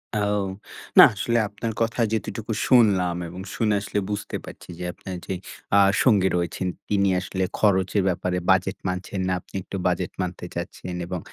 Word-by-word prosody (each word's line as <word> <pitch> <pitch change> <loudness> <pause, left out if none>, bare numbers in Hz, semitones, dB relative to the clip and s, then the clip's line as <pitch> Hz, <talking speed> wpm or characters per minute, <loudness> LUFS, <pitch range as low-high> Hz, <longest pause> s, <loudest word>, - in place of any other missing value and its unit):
ও! - - +1 0.8
না - - +13
আসলে 115 +4 0
আপনার 105 +3 -4
কথা 115 +1 +1
যেটুকু 110 0 -3 0.2
শুনলাম 100 -8 +4
এবং 90 +3 -8
শুনে 110 -2 +1
আসলে 105 0 -2
বুঝতে 105 -1 -3
পারছি - - -12
যে, - - -4
আপনার 95 - -7
যেই 95 -2 -3 0.4
আ - - +7 0.2
সঙ্গী 100 -7 +4
রয়েছেন, 90 +1 -2 0.2
তিনি 100 -1 +3
আসলে 95 +1 -3 0.2
খরচের 100 -1 +3
ব্যাপারে 90 0 -1
বাজেট 95 +1 +2
মানছেন 90 +1 -3
না। 95 - +1
আপনি - - -17
একটু 95 - -6
বাজেট 90 0 -1
মানতে 90 -1 -4
চাচ্ছেন 90 +1 -5
এবং 90 0 -3
95 Hz, 165 wpm, -24 LUFS, 90-105 Hz, 0.8 s, না